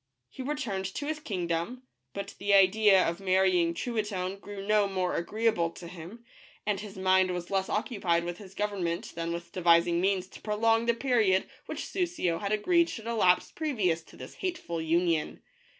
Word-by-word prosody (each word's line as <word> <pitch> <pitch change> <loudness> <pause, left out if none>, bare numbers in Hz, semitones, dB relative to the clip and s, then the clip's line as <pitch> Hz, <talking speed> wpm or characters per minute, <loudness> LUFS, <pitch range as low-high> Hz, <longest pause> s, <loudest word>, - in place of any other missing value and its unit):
He - - -8
returned 255 -9 -3
to 290 - -3
his 310 +1 -2
kingdom, 185 - -3 0.3
but 200 0 -5
the 200 0 +3
idea 195 0 +5
ot 170 +1 -2
marrying 185 -3 +2
Truitonne 205 -5 -2
grew 200 -1 -8
no 210 -1 +3
more 185 -2 -1
agreea 220 +6 +1
ble 170 -4 0
to 170 - -10
him, 180 +7 -10 0.4
and 210 -2 0
his 205 -2 -9
mind 185 0 +3
was 175 0 -4
less 190 -1 0
occupied 195 -6 0
with 175 0 -5
his 195 -2 -12
govern 205 -3 -2
ment 170 0 -3
than 165 0 -3
with 170 0 -6
devising 170 -1 +3
means 190 -1 +1
to - - -13
prolong 225 +2 +1
the 235 - +3
period 225 -7 +2 0.2
which - - -4
Soussio 345 - -1
had 200 0 -3
agreed 340 +11 +3
should 225 - -7
elapse 215 -6 +2
previous 215 - 0
to - - -16
this - - -9
hateful 330 - -3
union. 165 0 0
195 Hz, 180 wpm, -29 LUFS, 175-220 Hz, 0.4 s, idea